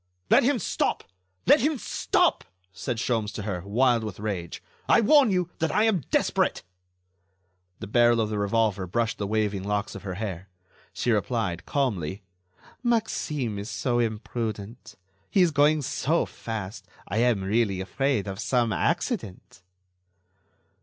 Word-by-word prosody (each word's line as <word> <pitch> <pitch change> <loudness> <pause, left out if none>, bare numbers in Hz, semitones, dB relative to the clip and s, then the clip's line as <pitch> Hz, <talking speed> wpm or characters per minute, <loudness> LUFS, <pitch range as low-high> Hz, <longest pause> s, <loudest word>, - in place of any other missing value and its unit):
"Let - - +7
him 270 +2 +2
stop! 205 - -1 0.4
Let - - +6
him 295 +4 +1
stop!" - - +1 0.3
said 120 +5 -3
Sholmes 110 -2 -1
to 105 - -5
her, 95 -4 -3
wild 120 +3 +2
with 105 -4 -6
rage, 100 -5 -4 0.3
"I - - +6
warn 270 +3 +5
you 180 -2 0
that 160 - 0
I 210 - +3
am 215 -7 +2
desperate." - - +1 1.2
The - - -6
barrel 120 +2 +4
of 110 -1 0
the 105 - -1
revolver 100 -2 +1
brushed 115 +4 -1
the 100 - -2
waving 105 -2 0
locks 105 +1 -2
of - - -8
her 95 -3 -5
hair. 95 -2 -5 0.4
She 120 - -1
replied, 105 -5 -1
calmly: 100 - -1 0.6
"Maxime 155 - -1
is 100 +3 -6
so 120 -2 0
imprudent. 110 0 -4 0.3
He 190 - +4
is 175 - +3
going 145 +1 +3
so 155 +6 0
fast, 105 -3 -6 0.2
I 105 - -3
am 115 -4 +2
really 100 -1 +1
afraid 130 +3 0
of 95 0 -5
some 115 -1 +1
accident." 165 - -2
115 Hz, 145 wpm, -26 LUFS, 100-140 Hz, 1.2 s, Let